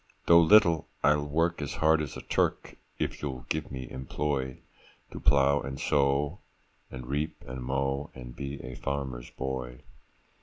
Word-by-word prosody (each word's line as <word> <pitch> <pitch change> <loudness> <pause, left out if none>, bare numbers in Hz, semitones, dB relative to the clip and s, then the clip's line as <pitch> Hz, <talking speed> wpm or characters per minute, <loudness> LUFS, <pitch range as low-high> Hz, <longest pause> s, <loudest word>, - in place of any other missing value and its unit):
Though 85 0 +8
little, 85 -2 +5 0.2
I'll 75 0 +3
work 80 +3 +1
as 70 - -3
hard 80 0 +4
as 75 - -5
a - - -8
Turk, - - 0 0.2
If - - -3
you'll 65 -4 -4
give 80 -1 -2
me 65 -2 -5
employ, 65 0 -3 0.5
To - - -7
plow 70 +1 +4
and 65 +1 -6
sow, 70 +3 +1 0.5
and 65 -1 -8
reap 75 +5 -3
and 65 0 -6
mow, 70 +2 -1
And 60 -2 -9
be 70 0 -5
a 65 +1 -6
farmer's 65 -2 -4
boy. 65 -2 -5
70 Hz, 155 wpm, -29 LUFS, 65-75 Hz, 0.5 s, Though